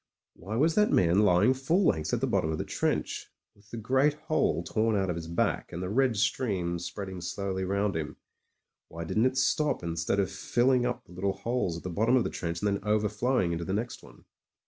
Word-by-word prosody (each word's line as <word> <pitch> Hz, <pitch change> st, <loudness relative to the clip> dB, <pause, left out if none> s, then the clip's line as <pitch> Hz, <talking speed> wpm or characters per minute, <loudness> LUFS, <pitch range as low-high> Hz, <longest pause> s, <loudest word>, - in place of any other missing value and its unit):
Why 100 Hz, +6 st, -7 dB
was 155 Hz, +7 st, +3 dB
that 210 Hz, +3 st, +3 dB
man 90 Hz, +2 st, +4 dB
lying 105 Hz, +4 st, +4 dB
full 160 Hz, +9 st, +1 dB
length 80 Hz, -, +1 dB
at -, -, 0 dB
the -, -, +2 dB
bottom 80 Hz, -, 0 dB
of 80 Hz, -, -2 dB
the -, -, -2 dB
trench, -, -, -2 dB, 0.3 s
with 100 Hz, 0 st, -24 dB
the 115 Hz, -, -7 dB
great 130 Hz, +6 st, +2 dB
hole 150 Hz, -, 0 dB
torn 110 Hz, +5 st, 0 dB
out 95 Hz, -2 st, +1 dB
of -, -, -3 dB
his 85 Hz, -1 st, -6 dB
back, 85 Hz, +1 st, -1 dB
and 90 Hz, -, -5 dB
the 90 Hz, -, -3 dB
red 125 Hz, -1 st, +2 dB
stream 95 Hz, -6 st, 0 dB
spreading 95 Hz, +1 st, -6 dB
slowly 95 Hz, +1 st, -3 dB
rotmd 100 Hz, 0 st, 0 dB
him; 80 Hz, -2 st, -4 dB, 0.7 s
why 85 Hz, +1 st, -6 dB
didn't 110 Hz, +8 st, +2 dB
it 130 Hz, 0 st, -3 dB
stop 150 Hz, -, +1 dB
instead 85 Hz, +3 st, -1 dB
of 100 Hz, -, 0 dB
filling 125 Hz, 0 st, +2 dB
up 125 Hz, -, -3 dB
the 90 Hz, -, -16 dB
Uttle 95 Hz, +2 st, -2 dB
holes 115 Hz, -7 st, -1 dB
at -, -, -10 dB
the 90 Hz, -, -4 dB
bottom 110 Hz, +8 st, +2 dB
of 125 Hz, -, +3 dB
the -, -, -3 dB
trench 85 Hz, +1 st, -4 dB
and -, -, +3 dB
then 100 Hz, -1 st, -1 dB
overflowing 105 Hz, 0 st, +1 dB
into 85 Hz, 0 st, -2 dB
the 95 Hz, -, -3 dB
next 115 Hz, +4 st, -3 dB
one? -, -, -17 dB
100 Hz, 220 wpm, -29 LUFS, 90-125 Hz, 0.7 s, man